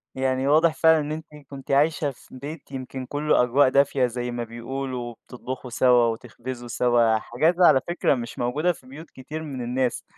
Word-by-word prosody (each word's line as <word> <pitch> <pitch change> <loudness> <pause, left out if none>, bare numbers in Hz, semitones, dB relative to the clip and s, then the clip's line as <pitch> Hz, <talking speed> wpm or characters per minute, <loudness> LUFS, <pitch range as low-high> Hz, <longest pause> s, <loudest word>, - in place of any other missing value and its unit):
يعني 130 0 0
واضح 155 +2 +4
فعلًا 160 0 +4
إن 150 0 -3
أنتِ 155 +1 -5 0.2
كنتِ 140 0 -8
عايشة 145 +1 +2
في 130 - -19
بيت 145 +1 -8
يمكن 130 0 -6
كلّه 145 0 +2
أجواء 130 +3 +4
دافية 140 -1 +3
زي 125 0 -3
ما 120 0 -3
بيقولوا 120 +2 -5
وبتطبخوا 125 +2 -8
سوا 125 0 +4
وتخبزوا 120 +2 -5
سوا، 120 -1 +2
الحاجات 150 +10 0
دي 180 - +2
على 135 -6 +6
فكرة 175 -5 +1
مش 120 -1 -7
موجودة 145 +9 +1
في 130 -6 -13
بيوت 150 +5 -11
كتير 150 +5 -8
من 135 -4 -6
الناس. 125 +1 -1
130 Hz, 185 wpm, -24 LUFS, 120-145 Hz, 0.2 s, على